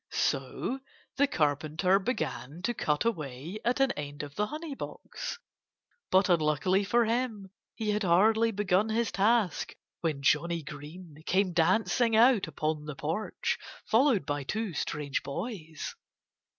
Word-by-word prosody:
So 265 Hz, -, -1 dB, 0.4 s
the 285 Hz, +1 st, +4 dB
Carpenter 155 Hz, -, +2 dB
began 160 Hz, -, -3 dB
to 240 Hz, -, +1 dB
cut 150 Hz, -3 st, 0 dB
away 155 Hz, -, -3 dB
at 245 Hz, +2 st, +1 dB
an 270 Hz, 0 st, +4 dB
end 145 Hz, 0 st, -5 dB
of 145 Hz, -1 st, -8 dB
the 210 Hz, +5 st, 0 dB
honey 310 Hz, +3 st, -5 dB
box. 375 Hz, -, -6 dB, 0.7 s
But 190 Hz, 0 st, +4 dB
unluckily 175 Hz, +3 st, +2 dB
for 235 Hz, +3 st, +3 dB
him, 225 Hz, -4 st, -2 dB, 0.2 s
he 220 Hz, -2 st, -1 dB
had 210 Hz, 0 st, 0 dB
hardly 215 Hz, +5 st, +4 dB
begun 205 Hz, 0 st, +1 dB
his 230 Hz, +1 st, 0 dB
task 205 Hz, -3 st, +1 dB, 0.2 s
when 155 Hz, -5 st, -2 dB
Johnnie 165 Hz, +3 st, +2 dB
Green 150 Hz, +3 st, -10 dB
came 185 Hz, -1 st, +2 dB
dancing 215 Hz, +7 st, +3 dB
out 230 Hz, -4 st, +5 dB
upon 155 Hz, 0 st, -2 dB
the 150 Hz, -2 st, -5 dB
porch, 165 Hz, +10 st, -2 dB, 0.3 s
followed 235 Hz, -2 st, +3 dB
by 145 Hz, -1 st, -1 dB
two 210 Hz, +6 st, -2 dB
strange 150 Hz, -1 st, -2 dB
boys. 160 Hz, -, -5 dB
185 Hz, 135 wpm, -30 LUFS, 150-225 Hz, 0.7 s, out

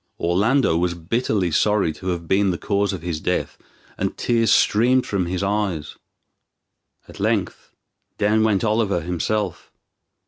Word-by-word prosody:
Orlando 100 Hz, +3 st, +2 dB
was 85 Hz, 0 st, 0 dB
bitterly 95 Hz, +1 st, -1 dB
sorry 105 Hz, -1 st, +2 dB
to 95 Hz, -, -9 dB
have 85 Hz, -2 st, -3 dB
been 100 Hz, +2 st, +2 dB
the 90 Hz, -, -1 dB
cause 100 Hz, +2 st, 0 dB
of 90 Hz, -5 st, -6 dB
his 85 Hz, -3 st, -3 dB
death, -, -, -2 dB, 0.4 s
and -, -, -2 dB
tears 115 Hz, -2 st, +1 dB
streamed 125 Hz, +4 st, +3 dB
from 95 Hz, -4 st, -1 dB
his 90 Hz, +2 st, -2 dB
eyes. 100 Hz, -7 st, -2 dB, 1.1 s
At -, -, -13 dB
length -, -, -1 dB, 0.5 s
down 105 Hz, +1 st, +2 dB
went 105 Hz, -2 st, +1 dB
Oliver 105 Hz, -5 st, +1 dB
himself. 90 Hz, +5 st, -3 dB
100 Hz, 140 wpm, -22 LUFS, 85-110 Hz, 1.1 s, streamed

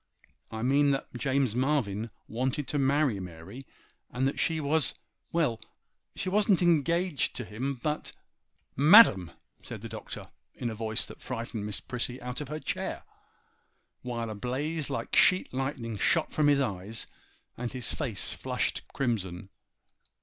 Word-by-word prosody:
I 110 Hz, 0 st, -5 dB
mean 140 Hz, +3 st, +4 dB
that 135 Hz, -1 st, -1 dB
James 130 Hz, -2 st, +1 dB
Marvyn 120 Hz, -5 st, 0 dB, 0.2 s
wanted 130 Hz, +4 st, -1 dB
to 145 Hz, -, 0 dB
marry 135 Hz, -5 st, +2 dB
Mary, 90 Hz, +8 st, -9 dB, 0.4 s
and 130 Hz, +2 st, 0 dB
that 135 Hz, -1 st, -2 dB
she 160 Hz, +5 st, +1 dB
was—well! 155 Hz, -2 st, -1 dB, 0.5 s
she -, -, -2 dB
wasn't 200 Hz, -1 st, +3 dB
engaged 170 Hz, 0 st, +2 dB
to 120 Hz, -, -4 dB
him—but—' 130 Hz, +7 st, -3 dB, 0.6 s
'MADAM!!' 140 Hz, -, +8 dB, 0.3 s
said -, -, -8 dB
the -, -, -7 dB
Doctor, -, -, -7 dB, 0.3 s
in 120 Hz, -, -3 dB
a -, -, -4 dB
voice 110 Hz, +1 st, -1 dB
that -, -, -11 dB
frightened 115 Hz, -4 st, -4 dB
Miss 105 Hz, -, -3 dB
Prissy 125 Hz, +1 st, -3 dB
out 125 Hz, +3 st, -5 dB
of 145 Hz, -, -5 dB
her 150 Hz, +2 st, -4 dB
chair, -, -, -3 dB, 1.0 s
while 115 Hz, -2 st, -3 dB
a -, -, -3 dB
blaze 140 Hz, +8 st, -2 dB
like 140 Hz, -, -3 dB
sheet 185 Hz, -6 st, +5 dB
lightning 130 Hz, -5 st, -3 dB
shot 165 Hz, -, +2 dB
from 150 Hz, -1 st, +3 dB
his 145 Hz, -1 st, +4 dB
eyes 105 Hz, -2 st, -2 dB, 0.5 s
and 120 Hz, 0 st, -4 dB
his 130 Hz, -2 st, -1 dB
face 120 Hz, -10 st, -1 dB
flushed -, -, -1 dB
crimson. 95 Hz, -8 st, -2 dB
130 Hz, 140 wpm, -29 LUFS, 115-145 Hz, 1.0 s, MADAM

